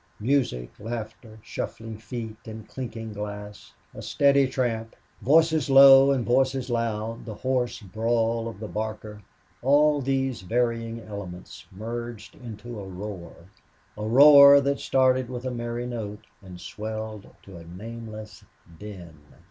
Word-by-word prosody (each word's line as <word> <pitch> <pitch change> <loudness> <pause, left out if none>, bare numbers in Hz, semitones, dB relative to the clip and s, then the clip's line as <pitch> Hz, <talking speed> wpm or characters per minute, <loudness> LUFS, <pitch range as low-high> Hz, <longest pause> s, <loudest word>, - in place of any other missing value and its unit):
Music, 115 - 0
laughter, 110 0 -7
shuffling 110 0 -6
feet 110 0 -7
and 110 -1 -9
clinking 115 -4 -7
glass, 105 0 -8 0.2
a - - -9
steady 140 -1 +3
tramp, 115 -3 -2 0.3
voices 160 0 +3
low 135 0 +8
and 130 -4 +1
voices 130 0 +1
loud, 115 -1 -2
the 110 -3 -8
hoarse 125 -1 -2
brawl 115 +3 -1
of 110 -4 -8
the 110 - -6
barker 110 -1 -6 0.4
all 145 +2 +3
these 135 -3 -1
varying 115 +2 -1
elements 100 -5 -9
merged 115 +2 -7
into 120 -3 -9
a - - -7
roar 95 -2 -7 0.6
a 105 - -6
roar 140 +4 +8
that 140 0 -1
started 130 -1 +2
with 125 0 -6
a 130 - -2
merry 120 0 -4
note 110 -4 -6 0.2
and 90 -2 -11
swelled 110 +1 -6 0.2
to 95 - -13
a 85 - -11
nameless 110 +4 -9 0.4
din. 90 -7 -10
115 Hz, 130 wpm, -25 LUFS, 105-130 Hz, 0.6 s, low